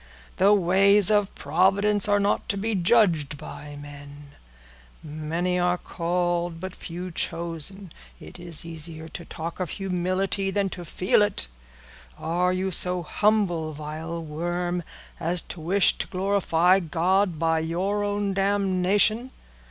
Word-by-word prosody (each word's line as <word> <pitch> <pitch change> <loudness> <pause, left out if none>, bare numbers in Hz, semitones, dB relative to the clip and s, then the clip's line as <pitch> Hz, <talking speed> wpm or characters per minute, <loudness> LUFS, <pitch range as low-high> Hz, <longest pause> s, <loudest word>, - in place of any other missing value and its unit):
The 195 +2 +5
ways 200 +1 +4
of 205 -2 +2
Providence 195 +7 +2
are 205 0 +3
not 200 +1 0
to 200 - 0
be 220 +3 -1
judged 175 - +3
by 145 +1 -9 1.3
men—'Many 160 +4 -2
are 180 0 +2
called, 175 -1 -2
but 185 +1 -6
few 180 +2 -7
chosen.' 170 +3 -4 0.3
It - - -11
is 170 -2 -3
easier 160 -1 -7
to 170 - -7
talk 165 +1 -7
of 180 -3 -2
humility 190 +1 -1
than 195 0 0
to 175 -1 -8
feel 185 +5 +2
it. 205 - +1 0.7
Are 175 +3 0
you 185 +1 -1
so 180 0 +3
humble, 175 -4 +1
vile 155 +3 -6
worm, 175 +3 -2 0.4
as 175 +1 0
to 170 - -11
wish 185 +4 +3
to - - -3
glorify 185 -2 +2
God 180 +2 +1
by 160 0 +1
your 185 +6 -1
own 205 -1 -1
damnation? 200 +4 +2
180 Hz, 130 wpm, -25 LUFS, 165-195 Hz, 1.3 s, The